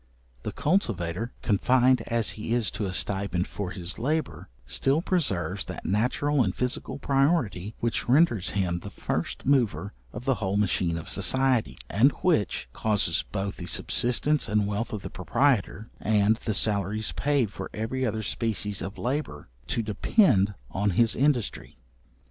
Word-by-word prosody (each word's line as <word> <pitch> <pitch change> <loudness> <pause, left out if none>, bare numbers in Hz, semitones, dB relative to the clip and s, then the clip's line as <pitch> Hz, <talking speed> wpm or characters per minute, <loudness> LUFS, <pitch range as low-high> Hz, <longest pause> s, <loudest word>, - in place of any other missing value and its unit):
The - - -4
cultivator, 115 - -1
confined 125 +4 +3
as 115 -2 0
he 110 +2 -4
is 120 -4 0
to 105 0 -3
a - - -3
stipend 95 -1 0
for 100 -3 -4
his 90 +3 -5
labour, 155 +6 -2 0.2
still 135 - +1
preserves 100 - -1
that - - -7
natural 125 - +1
and 95 -4 -2
physical 125 +2 -2
priority 135 - +1
which 115 0 -1
renders 125 - +4
him 90 -3 0
the - - -8
first - - -3
mover 125 -7 +1 0.2
of 120 - -8
the 135 - +3
whole 100 0 0
machine 90 -4 +1
of 80 - -7
society, 130 -3 +1
and 125 +8 +4
which 155 - +1
causes 105 -6 0
both 100 0 -3
the - - -7
subsistence 125 +3 +1
and 105 0 +2
wealth 105 +3 -2
of 105 -3 -5
the - - -6
proprietor, 115 +1 0
and 105 0 +3
the 110 - 0
salaries 105 0 +1
paid 140 -8 0
for - - -6
every 115 +5 -3
other 110 -2 -1
species 105 -2 -2
of 95 +2 -6
labour, 125 - -3 0.2
to 115 - -1
depend 105 - +3 0.2
on 100 +2 0
his 115 -2 +4
industry. 130 - 0
110 Hz, 155 wpm, -27 LUFS, 100-130 Hz, 0.2 s, renders